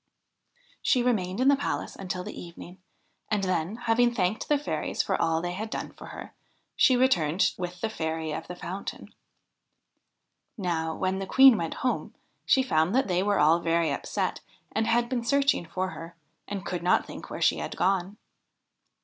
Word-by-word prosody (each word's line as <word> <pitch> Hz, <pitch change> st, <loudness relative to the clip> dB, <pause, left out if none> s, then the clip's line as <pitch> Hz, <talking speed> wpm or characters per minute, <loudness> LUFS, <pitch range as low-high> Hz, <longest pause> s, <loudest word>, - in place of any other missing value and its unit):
She 250 Hz, -4 st, +3 dB
remained 195 Hz, -6 st, 0 dB
in 260 Hz, -, +3 dB
the 280 Hz, -, +7 dB
palace 280 Hz, -, -3 dB
until 180 Hz, -1 st, -4 dB
the -, -, -7 dB
evening, 175 Hz, +1 st, -11 dB, 0.5 s
and 210 Hz, -2 st, 0 dB
then, 185 Hz, +1 st, -1 dB
having 240 Hz, 0 st, +2 dB
thanked 205 Hz, -2 st, -1 dB
the 295 Hz, -, +4 dB
fairies 290 Hz, -, -2 dB
for -, -, -1 dB
all 165 Hz, -1 st, +1 dB
they 175 Hz, -, -2 dB
had 210 Hz, +5 st, -4 dB
done -, -, -4 dB
for -, -, -11 dB
her, -, -, -9 dB, 0.4 s
she 255 Hz, -, +5 dB
returned 185 Hz, -, +2 dB
with 180 Hz, -1 st, -6 dB
the -, -, +1 dB
Fairy 160 Hz, -6 st, -3 dB
of -, -, -5 dB
the 180 Hz, -, -6 dB
Fountain. 185 Hz, +3 st, -7 dB, 1.4 s
Now, 165 Hz, -5 st, -1 dB
when 190 Hz, 0 st, -1 dB
the 195 Hz, -, -4 dB
Queen 265 Hz, +1 st, +8 dB
went 165 Hz, -5 st, -3 dB
home, 250 Hz, -, -1 dB, 0.3 s
she 265 Hz, -, +5 dB
found 170 Hz, -4 st, +1 dB
that 265 Hz, -, +3 dB
they 180 Hz, -1 st, +1 dB
were 205 Hz, +1 st, +1 dB
all 160 Hz, +2 st, +5 dB
very 165 Hz, -1 st, +1 dB
upset, -, -, -2 dB, 0.3 s
and 220 Hz, -, 0 dB
had 235 Hz, +1 st, +2 dB
been 245 Hz, -2 st, -2 dB
searching 275 Hz, -, +2 dB
for 185 Hz, +3 st, -2 dB
her, 165 Hz, 0 st, -9 dB, 0.3 s
and 200 Hz, -2 st, -5 dB
could 180 Hz, -2 st, -3 dB
not 180 Hz, -, +3 dB
think -, -, -9 dB
where -, -, -6 dB
she -, -, +3 dB
had -, -, -5 dB
gone. 190 Hz, +1 st, 0 dB
190 Hz, 180 wpm, -27 LUFS, 170-235 Hz, 1.4 s, Queen